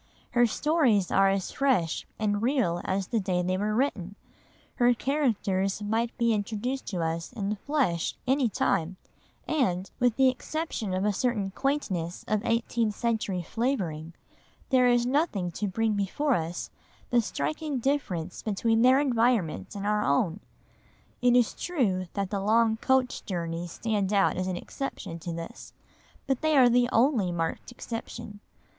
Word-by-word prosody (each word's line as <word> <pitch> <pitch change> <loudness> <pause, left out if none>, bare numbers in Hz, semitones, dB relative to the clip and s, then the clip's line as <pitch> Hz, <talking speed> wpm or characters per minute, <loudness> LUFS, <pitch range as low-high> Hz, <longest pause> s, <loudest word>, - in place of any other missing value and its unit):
Her 240 0 +4
stories 245 - +2
are 195 0 +5
as 195 -1 -1
fresh 255 - +1
and 205 -1 0
real 230 -9 +1
as 190 0 -1
the 230 - +1
day 185 -3 0
they 185 +1 0
were 210 +2 -1
written, 205 -7 -1 0.6
her 245 0 +4
characters 215 -9 0
might 225 +3 -1
be 235 -2 +2
introduced 220 +5 -3
to 180 -4 -2
us 165 0 -3
in 200 -4 -3
the - - 0
flesh 230 - 0
any 265 -1 +2
time, 185 -3 0 0.5
and, 195 - 0
with 245 -2 +3
the 265 +1 +5
exception 255 - -2
of 190 +2 0
a 210 - +2
certain 210 -3 -1
quaintness 190 - -2
of 215 0 0
eighteenth 230 -2 0
century 215 -6 -1
flavouring, 170 - -2 0.5
there 255 -2 +4
is 240 -1 +3
nothing 250 - 0
to 205 +5 -3
bring 220 +3 0
before 210 +9 0
us 170 -4 -3 0.4
the 240 -1 +4
striking 220 - -3
difference 210 - -2
between 225 +2 +1
their 255 +2 +6
environment 230 - +1
and 200 0 -4
our 210 0 +1
own. 160 +6 +1 0.8
It 245 0 +4
is 245 -3 +3
true 205 - -1
that 200 -2 -2
the 200 -2 -1
long 220 +2 +3
coach 260 +1 +1
journeys 170 -2 -4
stand 210 -4 -1
out 200 -2 +3
as 185 +1 -2
an 185 -1 -2
exception 195 - -6
to 170 +1 -5
this, 165 0 -8 0.5
but 270 -2 -1
they 310 -1 +3
are 250 -2 +7
the 245 0 +3
only 230 -7 +3
marked 165 +6 -3
exception. 230 -3 -7
215 Hz, 155 wpm, -28 LUFS, 185-250 Hz, 0.8 s, are